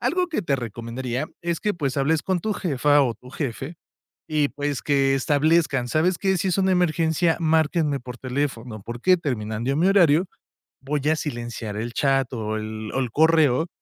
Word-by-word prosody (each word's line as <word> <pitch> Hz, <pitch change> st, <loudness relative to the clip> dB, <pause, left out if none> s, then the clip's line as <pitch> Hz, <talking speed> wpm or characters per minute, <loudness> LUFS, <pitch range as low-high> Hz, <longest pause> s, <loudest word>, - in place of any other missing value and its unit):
Algo 360 Hz, +1 st, +1 dB
que 305 Hz, -, -2 dB
te 140 Hz, -5 st, 0 dB
recomendaría 120 Hz, +4 st, -4 dB, 0.2 s
es 170 Hz, -1 st, -2 dB
que, 210 Hz, -, 0 dB
pues, 140 Hz, -6 st, -2 dB
hables 150 Hz, +2 st, +1 dB
con 185 Hz, -2 st, -1 dB
tu 215 Hz, +3 st, -1 dB
jefa 145 Hz, -5 st, +2 dB
o 120 Hz, -3 st, 0 dB
tu 125 Hz, -, -15 dB
jefe. 140 Hz, +3 st, -5 dB, 0.5 s
Y 150 Hz, -2 st, +1 dB
pues 145 Hz, -1 st, -3 dB
que 135 Hz, -2 st, +2 dB
establezcan. 145 Hz, -2 st, +2 dB
¿Sabes 170 Hz, +6 st, +2 dB
qué? 190 Hz, -2 st, +1 dB
Si 190 Hz, -, -1 dB
es 185 Hz, -, 0 dB
una 190 Hz, 0 st, +2 dB
emergencia, 165 Hz, -1 st, +1 dB
márquenme 160 Hz, -2 st, +2 dB
por 125 Hz, 0 st, -9 dB
teléfono. 125 Hz, -4 st, -3 dB
Porque, 120 Hz, +11 st, +2 dB
terminando 120 Hz, -3 st, -2 dB
mi 175 Hz, +5 st, +3 dB
horario, 175 Hz, -3 st, +4 dB, 0.6 s
voy 145 Hz, +2 st, -1 dB
a 160 Hz, -, +3 dB
silenciar 120 Hz, -7 st, -5 dB
el 120 Hz, +2 st, -4 dB
chat 135 Hz, -2 st, +1 dB
o 110 Hz, -2 st, -3 dB
el 110 Hz, 0 st, -6 dB
o 135 Hz, -, 0 dB
el 125 Hz, -4 st, -2 dB
correo. 160 Hz, 0 st, +3 dB
145 Hz, 180 wpm, -23 LUFS, 125-165 Hz, 0.6 s, horario